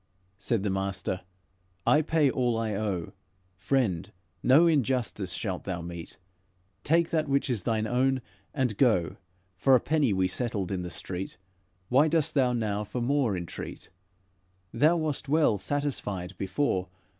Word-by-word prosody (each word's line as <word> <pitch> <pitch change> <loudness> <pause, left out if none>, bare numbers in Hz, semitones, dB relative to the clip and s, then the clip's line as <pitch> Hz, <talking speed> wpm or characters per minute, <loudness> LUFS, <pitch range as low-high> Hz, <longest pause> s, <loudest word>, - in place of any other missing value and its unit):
Said 105 0 0
the 100 - 0
master: 95 -1 -2 0.6
'I 150 - +5
pay 155 -1 +2
all 125 -3 +1
I 110 -2 -1
owe; 100 -5 -2 0.4
Friend, 95 -3 0 0.3
no 145 +7 +6
injustice 130 - +1
shalt 95 -1 -3
thou 90 -3 -3
meet; 85 -1 -8 0.7
Take 165 +2 +2
that 155 -2 +1
which 140 -1 +1
is 115 -5 -1
thine 110 +2 0
own 130 +2 +1 0.3
and 125 -7 -1
go. 105 - +3 0.4
For 135 +7 +5
a - - +5
penny 150 -2 +1
we 95 -1 +2
settled 100 -2 -2
in 95 -2 -1
the 90 - -5
street; 90 +1 -5 0.5
Why 140 +5 +5
dost 160 -1 +1
thou 130 -4 +3
now 105 -3 -1
for 115 +4 -5
more 120 -5 +1
entreat? 85 -1 -7 0.8
Thou 160 +4 +4
wast 150 -3 -2
well 150 -9 +3
satisfied 105 -10 -2
before. 95 -2 0
115 Hz, 145 wpm, -28 LUFS, 95-140 Hz, 0.8 s, no